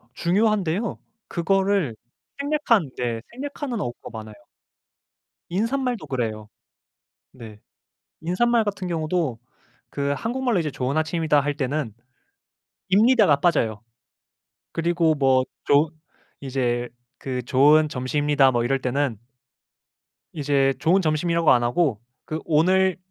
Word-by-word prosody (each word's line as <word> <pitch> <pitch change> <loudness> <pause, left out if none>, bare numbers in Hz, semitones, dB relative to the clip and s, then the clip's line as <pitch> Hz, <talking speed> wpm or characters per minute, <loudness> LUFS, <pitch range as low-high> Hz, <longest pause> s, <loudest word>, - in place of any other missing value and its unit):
중요한데요. 200 +1 0 0.3
그거를 190 - 0 0.4
생략한 280 - +1
네 115 -2 -2
생략하는 270 -1 -5
어구가 120 -7 -6
많아요. 110 -1 -9 1.1
인사말도 240 +5 -1
그래요. 110 -5 -3 0.8
네. 110 -5 -12 0.6
인사말 225 +8 +2
같은 200 -3 -4
경우도 160 -6 -1 0.5
그 140 0 -1
한국말로 240 - -1
이제 155 -3 -2
"좋은 130 +3 -2
아침이다." 160 -1 +1
할 145 +1 -2
때는 140 -4 -2 1.0
입니다가 210 - +5
빠져요. 115 - +1 0.9
그리고 165 -1 +1
뭐 135 -3 +3 0.2
좋은 145 +3 +4 0.5
이제 125 -3 -1 0.3
그 125 -2 -4
"좋은 150 +5 +4
점심이다." 145 0 +2
뭐 120 -2 0
이럴 135 +2 0
때는 130 -2 -1 1.2
이제 140 -3 +1
"좋은 175 +6 +3
점심."이라고 165 0 +2
안 120 -1 +4
하고 120 - +1 0.2
그 155 - -4
"오늘 185 +4 +3
155 Hz, 250 characters per minute, -23 LUFS, 130-190 Hz, 1.2 s, 입니다가